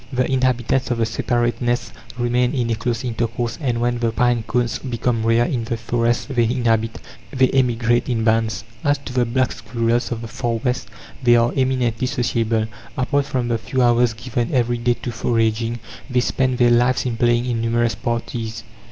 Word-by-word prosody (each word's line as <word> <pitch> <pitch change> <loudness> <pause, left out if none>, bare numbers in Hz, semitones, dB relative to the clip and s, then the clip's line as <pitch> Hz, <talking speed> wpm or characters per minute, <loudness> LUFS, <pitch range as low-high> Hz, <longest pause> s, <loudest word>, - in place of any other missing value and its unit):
The 130 -1 +1
inhabitants 130 0 +1
of 120 - 0
the 115 - +2
separate 120 +1 -1
nests 120 0 -1 0.3
remain 120 +2 +1
in 120 -3 0
a - - +1
close 115 +1 -2
intercourse, 115 +1 -2
and 120 -5 0
when 120 0 0
the 115 -1 +1
pine 120 0 +2
cones 120 +1 -1
become 120 -2 -1
rare 115 +1 +3
in 120 -2 -2
the 115 0 -2
forest 120 +3 -1
they 120 -2 +3
inhabit, 115 -2 0 0.3
they 130 -2 +2
emigrate 120 -2 +1
in 115 -2 0
bands. 115 0 +1 0.2
As 145 0 +2
to 140 -2 -9
the 125 -1 +2
black 130 +2 +1
squirrels 115 +1 -1
of 115 -1 -3
the - - -5
Far 120 +1 -2
West, 125 0 -2 0.3
they 120 -2 +5
are 120 0 +3
eminently 130 -3 +1
sociable. 115 -4 0 0.3
Apart 140 +2 +1
from 125 -3 -1
the 115 -1 0
few 130 +3 0
hours 120 -1 +3
given 120 +1 -3
every 120 -2 +1
day 120 0 +2
to 120 - -2
foraging, 115 0 0 0.3
they 125 -1 +2
spend 130 0 0
their 120 -1 +4
lives 125 +2 +3
in 120 -2 -1
playing 120 +1 +2
in 120 -2 -1
numerous 115 0 +1
parties. 115 -1 -4
120 Hz, 185 wpm, -21 LUFS, 115-125 Hz, 0.3 s, they